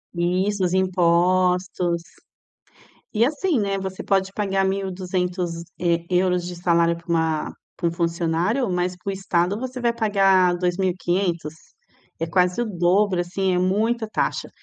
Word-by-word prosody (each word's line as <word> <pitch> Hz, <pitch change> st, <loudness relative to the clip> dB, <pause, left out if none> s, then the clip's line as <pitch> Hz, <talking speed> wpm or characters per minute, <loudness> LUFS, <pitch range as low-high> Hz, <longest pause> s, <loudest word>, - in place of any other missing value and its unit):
Isso, 185 Hz, +3 st, 0 dB
os 180 Hz, -, +1 dB
impostos. 180 Hz, -1 st, +2 dB, 1.1 s
E 220 Hz, +2 st, +4 dB
assim, 300 Hz, +3 st, 0 dB
né, 200 Hz, -2 st, 0 dB
você 190 Hz, -1 st, -5 dB
pode 195 Hz, -1 st, +1 dB
pagar 195 Hz, -2 st, 0 dB
£1200 180 Hz, -2 st, -1 dB
de 180 Hz, -, -5 dB
salário 170 Hz, -1 st, +2 dB
para 170 Hz, +1 st, -16 dB
uma 160 Hz, -2 st, 0 dB, 0.3 s
para 170 Hz, -, +1 dB
um -, -, -4 dB
funcionário, 170 Hz, +7 st, 0 dB
mas 180 Hz, 0 st, -1 dB
para 190 Hz, +2 st, -5 dB
o -, -, -2 dB
estado 190 Hz, 0 st, 0 dB
você 255 Hz, 0 st, -5 dB
vai 235 Hz, -1 st, +2 dB
pagar 195 Hz, -5 st, +3 dB
£2500. 180 Hz, -2 st, -1 dB, 0.7 s
É 165 Hz, -, -2 dB
quase 180 Hz, +4 st, +1 dB
o -, -, 0 dB
dobro, 185 Hz, -1 st, +2 dB
assim, 185 Hz, +1 st, -1 dB
é -, -, +1 dB
muita 220 Hz, +5 st, 0 dB
taxa. -, -, -2 dB
180 Hz, 135 wpm, -23 LUFS, 175-195 Hz, 1.1 s, E